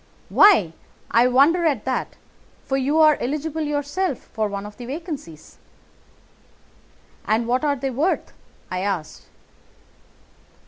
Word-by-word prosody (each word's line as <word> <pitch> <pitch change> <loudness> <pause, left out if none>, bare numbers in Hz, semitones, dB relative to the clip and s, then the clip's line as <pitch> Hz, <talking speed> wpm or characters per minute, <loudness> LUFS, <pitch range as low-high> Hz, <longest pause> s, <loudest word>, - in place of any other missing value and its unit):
"'Why, 335 - +5 0.4
I 235 +2 +5
wonder 285 +8 +4
at 275 -9 -1
that, 260 -1 -2 0.5
for 270 - -1
you 270 +3 0
are 310 -1 +5
eligible 305 +4 -3
yourself 295 +2 -2 0.2
for 215 -1 0
one 200 0 -5
of 210 0 -10
the 245 - -9
vacancies.' 275 - -8 1.7
"'And 220 +2 +1
what 250 +4 0
are 290 -1 +1
they 270 0 -3
worth?' 295 +9 -1 0.4
I 185 - -2
asked. 185 -6 -4
270 Hz, 125 wpm, -22 LUFS, 220-305 Hz, 1.7 s, Why